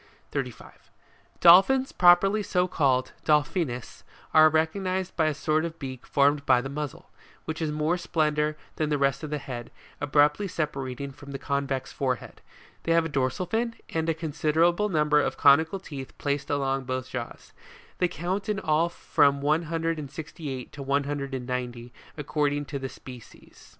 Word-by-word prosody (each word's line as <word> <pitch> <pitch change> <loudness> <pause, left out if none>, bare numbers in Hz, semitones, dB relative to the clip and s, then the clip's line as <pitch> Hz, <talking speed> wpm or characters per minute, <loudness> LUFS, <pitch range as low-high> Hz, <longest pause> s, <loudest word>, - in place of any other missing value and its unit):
35. - - -6 0.5
DOLPHINS 195 +10 +7
PROPERLY 195 +4 +5
so 180 -2 +1
CALLED, 130 -7 +1
Delphinus, 150 - 0 0.3
are 155 0 +8
recog 160 +5 +1
nised 185 0 -2
by 160 -2 +2
a 155 - +1
sort 155 +1 0
of 165 -1 -5
beak 130 -4 -7
formed 140 +1 +3
by 130 -3 +4
the 135 +2 -5
muzzle, 150 -2 -6 0.3
which 160 +1 -4
is 155 -2 -1
more 155 +3 0
slender 150 -2 0 0.2
than 155 -1 0
the 150 - +1
rest 140 -2 +1
of 155 - -5
the 150 - -2
head, 125 -4 -7 0.3
abruptly 145 +6 +3
separating 140 -5 -4
from 140 +1 -13
the - - -3
convex 140 -1 -2
forehead: 130 -2 -3 0.4
they 165 - +1
have 165 0 +3
a - - -3
dorsal 135 +4 -1
fin, 230 +5 -1
and 160 0 -1
a 165 - +1
considerable 165 +5 +1
number 150 -3 +3
of - - -2
conical 160 +6 +5
teeth 140 -7 -9
placed 145 -1 -2
along 135 -1 0
both 130 0 -3
jaws; 120 -2 -7 0.5
they 180 - +3
count 185 +5 -3
in 210 -2 0
all 160 +1 +1
from 140 -4 +2
one 155 +4 +1
hundred 165 -1 -1
and 145 -3 -6
sixty 155 +1 -7
eight, 130 -2 -6
to 145 - -9
one 140 +1 +1
hundred 140 -1 -4
and 125 -1 -5
ninety, 125 -1 -5 0.2
according 145 0 -1
to 140 -1 -5
the 135 0 -4
species. 125 -3 -14
150 Hz, 175 wpm, -26 LUFS, 135-165 Hz, 0.5 s, are